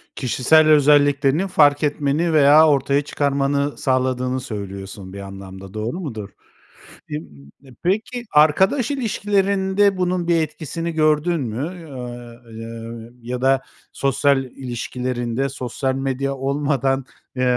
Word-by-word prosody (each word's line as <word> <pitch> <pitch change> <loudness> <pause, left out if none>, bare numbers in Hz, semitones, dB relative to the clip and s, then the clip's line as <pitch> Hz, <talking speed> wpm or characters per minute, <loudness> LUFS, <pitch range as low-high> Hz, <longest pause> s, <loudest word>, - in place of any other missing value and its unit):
Kişisel 145 +5 +3
özelliklerini 145 +2 +4
fark 145 -4 +4
etmeni 150 +3 0
veya 150 +1 +7
ortaya 140 -1 +2
çıkarmanı 140 0 -1
sağladığını 130 0 0
söylüyorsun, 100 -4 -7
bir 100 - -7
anlamda, 95 0 -10
doğru 110 - -4
mudur? 110 - -6 0.8
M 75 - -3 0.4
d 130 -3 -17
peki, 220 +6 -1
arkadaş 190 - +4
ilişkilerinde 200 -5 +1
bunun 180 -1 -1
bir 170 -1 +3
etkisini 160 +2 -4
gördün 155 +1 +2
mü, 150 +9 -5
a 120 -2 -9
y 115 0 -8 0.6
ya 125 - -3
da 135 0 +3 0.3
sosyal 140 0 +1
ilişkilerinde, 125 0 -3
sosyal 130 +1 -3
medya 135 0 -2
olmadan, 135 -1 0 0.3
eee, 125 - -1
140 Hz, 115 wpm, -21 LUFS, 125-155 Hz, 0.8 s, veya